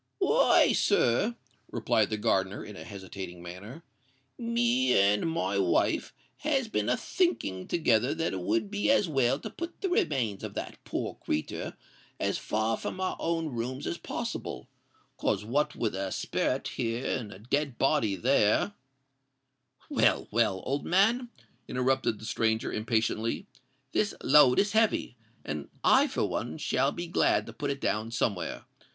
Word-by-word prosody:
"Why, - - +4
sir," 205 - +2 0.3
replied 110 -2 +1
the 110 - -1
gardener, 100 -2 0
in 105 - -9
a - - -8
hesitating 95 -3 -8
manner, 100 - -9 0.5
"me 240 +2 +2
and 100 +10 +3
my 100 - 0
wife 95 -3 +1 0.3
has 275 -5 0
been 220 - -1
a - - +2
thinking 100 - -1
together 130 -4 +2
that 165 -7 -1
it 95 - -2
would 110 - 0
be 205 +3 0
as 275 -8 +4
well 135 -4 +2
to - - -7
put 340 +1 -7
the 385 - 0
remains 125 - 0
of - - -6
that - - -6
poor - - -4
creetur 75 - -3 0.4
as - - 0
far 110 +1 0
from - - -5
our 185 - -1
own 165 -1 -1
rooms 125 +1 -4
as 85 - -3
possible: - - -5 0.5
'cos 100 - 0
what 140 +7 0
with 110 -3 -1
a 95 0 -3
sperret - - -1
here 115 +2 -2
and 110 -4 -8
a 95 - -10
dead 135 +4 -1
body 135 -8 +2
there——" 120 - +2 1.1
"Well, - - +2
well—old 115 +4 0
man," 225 +7 +3 0.4
interrupted 130 -3 +1
the 110 - -10
stranger, 110 0 0
impatiently; 110 0 0 0.5
"this 210 - 0
load 140 -3 +6
is 205 0 +3
heavy, 220 - +2 0.3
and 75 -2 -4
I - - +5
for - - -1
one - - -3
shall 135 +2 +1
be 175 - -5
glad 170 - +2
to - - -9
put 145 -2 -3
it 140 0 -2
down 110 0 -1
somewhere. 105 -7 -2
120 Hz, 155 wpm, -29 LUFS, 105-165 Hz, 1.1 s, load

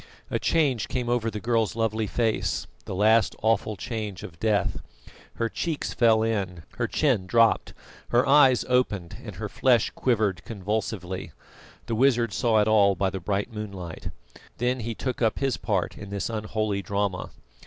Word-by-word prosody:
A - - 0
change 140 -9 +1
came 125 -2 -2
over 120 -2 +1
the 105 -1 -5
girl's 115 -1 0
lovely 110 -1 0
face, 115 +1 0 0.2
the - - -5
last 110 +3 +4
awful 110 -1 +1
change 105 -2 -5
of 85 -2 -10
death. 105 -3 +1 0.6
Her 115 - 0
cheeks 155 +6 -3
fell 110 -2 +4
in, 95 -7 -2
her 120 - 0
chin 120 -9 +1
dropped, 115 +2 +3 0.3
her 120 +2 +3
eyes 135 -3 +6
opened, 105 -9 0
and - - -8
her - - -4
flesh 125 -4 +2
quivered 105 -8 0
convulsively. 100 -3 -4 0.5
The - - -3
wizard 120 -2 +3
saw 110 0 +2
it 105 - +1
all 100 -2 +5
by 95 -1 0
the 95 - -4
bright 100 +5 -2
moonlight. 100 -6 -6 0.5
Then 125 +2 0
he 115 0 -4
took 130 +1 -4
up 110 -2 +2
his 135 -2 0
part 100 -5 -2
in 100 - -8
this 100 +3 -3
unholy 110 -2 -2
drama. 100 -2 -2
110 Hz, 165 wpm, -26 LUFS, 100-120 Hz, 0.6 s, eyes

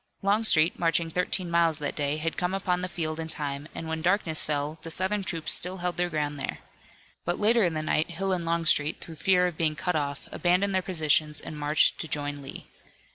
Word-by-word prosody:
Longstreet, 195 -5 +4
marching 165 -1 +1
thirteen 180 0 0
miles 170 -2 +3
that 145 -2 -3
day, 145 0 -1
had 165 +1 -2
come 180 +1 -1
upon 180 -2 -1
the 180 - -2
field 160 -3 -3
in 160 - -4
time, 145 -2 -3
and 165 - -6
when 160 0 -3
darkness 175 -3 +2
fell 150 +1 -2
the 165 - -8
Southern 190 +4 0
troops 165 -4 +1
still 185 +2 +2
held 180 0 -2
their 175 0 +1
ground 150 -2 -2
there. 135 - -4 0.7
But 175 +1 -1
later 225 +2 +3
in 170 -3 0
the 155 - -2
night 155 +1 0
Hill 190 +3 -2
and 175 -2 -1
Longstreet, 165 -2 +1
through 165 -2 -10
fear 180 +2 +3
of 175 -3 -3
being 155 -2 0
cut 180 +2 -2
off, 140 -2 -3
abandoned 180 +3 +1
their 190 - +2
positions 155 -4 +1
and 155 - -8
marched 150 0 +2
to 160 - -4
join 145 -1 -3
Lee. 135 - -9
165 Hz, 215 wpm, -27 LUFS, 155-180 Hz, 0.7 s, Longstreet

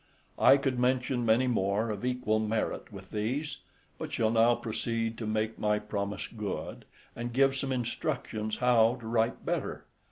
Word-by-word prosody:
I 140 - +7
could 135 -3 -1
mention 125 -1 +1
many 115 +4 +4
more 110 -2 +1
of 105 0 -5
equal 125 -4 +1
merit 110 0 -2
with 95 -2 -11
these, 125 +8 -2 0.4
but - - -5
shall 110 -1 +1
now 115 +1 +5
proceed 115 0 -2
to 110 - -3
make 110 +1 -1
my 105 0 +2
promise 100 -1 -3
good, 105 -4 -5 0.3
and 120 +1 -4
give 135 +2 +3
some 135 0 -2
instructions 110 -3 -2
how 120 -1 +4
to - - -9
write 115 0 0
better. - - -2
115 Hz, 160 wpm, -30 LUFS, 110-125 Hz, 0.4 s, I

